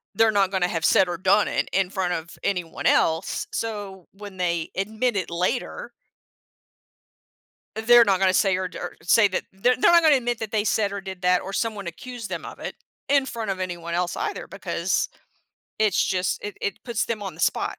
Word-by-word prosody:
they're 225 -1 +4
not 195 -2 +2
gonna 190 -2 +1
have 165 -3 -2
said 190 - +5
or 175 - -3
done 200 +4 +3
it - - -1
in 190 -1 +2
front 185 -3 -1
of 165 0 -6
anyone 180 -4 -2
else, 160 +3 +1
so 205 -5 -5
when 200 -1 -10
they 170 -2 -1
admit 220 +4 -1
it 185 - -2
later 180 +9 -2 1.9
they're 235 +1 +6
not 195 -2 +2
gonna 190 -1 +4
a - - -5
say 190 -1 +3
or 185 0 -2
d - - -10
or - - -6
say 205 +4 +5
that 185 - -2
they're 245 +6 +2
they're 300 - +5
not 340 0 +7
gonna 310 -3 +6
admit 240 -2 -1
that 220 -2 -5
they 215 -2 +1
said 205 -1 +1
or 200 0 -4
did 190 -1 -8
that 180 0 +3
or 195 - -7
someone 210 -5 -2
accused 235 +5 -7
them 170 -3 -5
of - - -9
it - - -6 0.3
in 280 -1 +4
front 225 -5 -3
of 190 - -4
anyone 175 -2 -4
else 175 0 -1
either 420 -2 -3
because, - - -1 0.7
it's 215 -3 +3
just 185 -1 -1
it 205 - -6
it 200 - -2
puts 235 -3 -1
them 225 -3 -3
on 195 - -5
the - - -10
spot. - - 0
195 Hz, 210 wpm, -24 LUFS, 180-220 Hz, 1.9 s, not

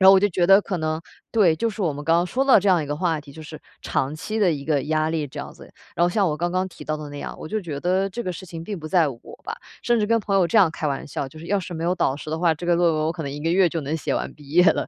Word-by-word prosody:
然 190 - +8
后 195 - +10
我 - - +7
就 205 - +4
觉 175 -1 +1
得 195 +2 +7
可 185 - -3
能 155 0 -1 0.3
对， 195 -8 +4
就 230 +9 -1
是 215 -1 -4
我 165 -5 +1
们 145 +1 -7
刚 165 +2 +3
刚 175 - +2
说 250 +9 -1
到 270 -4 +6
这 195 0 +2
样 175 -3 +3
一 145 - -5
个 145 +1 -3
话 165 -3 0
题， 145 -1 -14
就 160 +2 -10
是 155 0 -10 0.2
长 135 +3 -1
期 215 +7 -4
的 200 -4 +4
一 145 -3 -3
个 145 -3 +1
压 155 +1 +1
力 155 -2 -1
这 130 - -10
样 - - -6
子。 - - -15 0.2
然 170 - 0
后 175 - +5
像 195 +2 +2
我 155 -3 -1
刚 175 +2 0
刚 185 +1 0
提 180 - -12
到 155 0 -2
的 150 -1 -8
那 145 - -7
样， - - -6
我 - - -7
就 215 +5 -2
觉 155 -6 -5
得 185 +5 +1
这 235 +5 -5
个 185 - -3
事 185 +2 -9
情 165 -1 -8
并 200 -1 -5
不 155 - -6
在 165 -3 +3
我 120 -4 -8 0.2
吧， - - -4 0.3
甚 240 -1 +2
至 210 - +1
跟 230 +1 +3
朋 200 -2 -2
友 185 -3 +4
这 225 - 0
样 190 -6 +6
开 155 -1 -4
玩 135 -1 -3
笑， 140 -1 -4
就 155 - -13
是 165 - -9
要 200 -1 +1
是 175 0 -7
没 165 +1 -4
有 180 - +2
导 135 -6 0
师 150 - -8
的 160 - -2
话， 165 -1 +3
这 160 - -8
个 175 0 +3
论 170 -1 +3
文 155 0 0
我 160 - 0
可 165 - -6
能 140 - -4
1 145 +1 -6
个 165 - 0
月 185 0 +4
就 165 -1 -3
能 145 +3 -3
写 160 - -2
完 - - -3
毕 145 -2 -16
业 175 +4 +5
了， - - +3
170 Hz, 385 characters per minute, -23 LUFS, 155-190 Hz, 0.3 s, 后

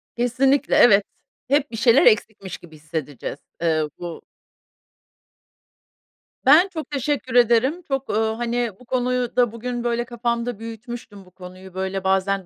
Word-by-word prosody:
Kesinlikle, 260 +3 +2
evet, 205 -3 +6 0.4
hep 285 +1 +1
bir 225 - -5
şeyler 235 +3 +5
eksikmiş 215 - +1
gibi 160 -2 -15
hissedeceğiz. 150 -3 -6 0.2
Eee 160 -2 +2 0.2
bu 175 -2 -7 2.2
Ben 315 +8 +7
çok 315 -2 -6
teşekkür 275 -2 -2
ederim. 245 +7 +3
Çok, 270 -1 -3
uuu, 220 +1 0
hani 240 -1 -1
bu 250 - -17
konuyu 250 -1 -1
da 245 -3 +3
bugün 240 +1 -5
böyle 240 0 -1
kafamda 235 -1 -3
büyütmüştüm, 225 -3 -9
bu 180 - -20
konuyu, 185 +1 -12
böyle 190 0 -3
bazen 190 0 +1
235 Hz, 135 wpm, -22 LUFS, 190-250 Hz, 2.2 s, Ben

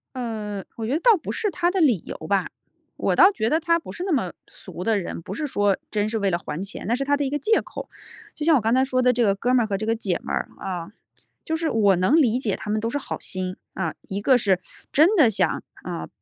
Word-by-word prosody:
呃， 215 -5 -4
我 225 - -4
觉 250 - -1
得 315 - +1
倒 445 +1 +5
不 - - -6
是 420 - -1
他 350 -1 +1
的 380 -2 0
理 245 - +4
由 - - -6
吧。 195 +1 +1 0.5
我 - - 0
倒 385 - +7
觉 220 - -1
得 315 +2 +2
他 335 0 +2
不 - - -10
是 350 - -6
那 375 - -2
么 210 - +1 0.2
俗 180 - -8
的 220 -1 +2
人， 175 - -5
不 190 - -7
是 300 +7 -3
说 205 -6 +1
真 210 0 0
是 220 0 -2
为 200 -1 +1
了 175 - +1
还 165 0 -6
钱， 200 - -6
那 235 - +2
是 275 - -2
他 285 +1 +2
的 285 - -1
一 265 - -1
个 295 - -1
借 440 +10 +3
口。 - - -8 0.5
就 300 - -2
像 325 -2 +6
我 250 - +3
刚 225 +3 +1
才 260 +1 +4
说 255 -1 +1
的 250 0 +5
这 240 -1 +1
个 200 -2 +3
哥 245 +5 0
们 250 -2 +4
儿 - - -6
和 200 - -1
这 215 - -3
个 225 +1 +1
姐 190 -6 -1
们 - - -7
儿 - - -1
啊， 180 -1 -5 0.5
就 320 - -2
是 325 -1 -1
我 205 -4 +4
能 185 - +3
理 250 -7 +4
解 215 -7 -1
他 210 - -8
们 215 +1 +1
都 225 - -2
是 285 - -1
好 - - -5
心。 185 0 -4 0.2
啊， 170 -4 -3
一 195 +1 -5
个 260 +2 +5
是 195 -5 +2 0.3
真 330 +9 +5
的 295 - +6
想， 205 - 0 0.2
啊， - - -5
230 Hz, 295 characters per minute, -24 LUFS, 200-290 Hz, 0.5 s, 倒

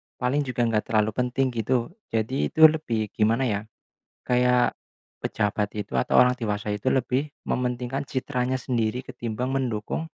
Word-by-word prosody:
paling 125 +3 0
juga 125 -1 0
enggak 115 -2 0
terlalu 110 -1 +2
penting 125 +1 +1
gitu. 120 +1 -1 0.2
Jadi 115 +5 0
itu 160 - +2
lebih 125 -10 +4
gimana 115 +4 +2
ya, 105 -5 0 0.7
kayak 125 -1 +3 0.5
pejabat 105 0 0
itu 100 -10 -4
atau 60 - +4
orang 125 0 +4
dewasa 105 -3 -3
itu 105 - 0
lebih 130 +3 0 0.2
mementingkan 125 +2 -1
citranya 130 -1 -2
sendiri 120 -1 -1
ketimbang 125 -2 -4
mendukung 120 +2 -2
125 Hz, 140 wpm, -25 LUFS, 110-130 Hz, 0.7 s, lebih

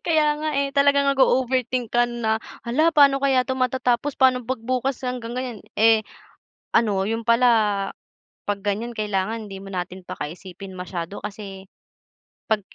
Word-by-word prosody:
Kaya 315 -2 +3
nga 310 0 -2
eh, 280 0 +1
talaga 280 0 +4
nag-o-overthink 255 -3 +1
ka 240 0 +4
na, 225 -2 -1 0.3
"Hala, 310 +8 +3
paano 280 -2 +5
kaya 260 -2 +3
'to 260 - -1
matatapos, 255 +1 0
paano 255 -2 +4
'pag 250 0 -3
bukas 255 +1 -1
hanggang 240 -2 -4
ngayon" 250 -4 -4 0.2
Eh, 220 0 +5 0.7
ano, 200 -4 +3
yun 225 +1 -2
pala, 235 +2 +4 1.0
'pag 200 -1 -1
ganiyan, 225 +4 -2
kailangan 210 +1 -2
hindi 195 -1 -7
na 190 -2 -3
natin 185 +1 -12
pakaisipin 185 +5 -7
masyado 180 0 -5
kasi 195 -2 -8 0.8
'pag 215 -1 +2
235 Hz, 145 wpm, -23 LUFS, 205-260 Hz, 1.0 s, paano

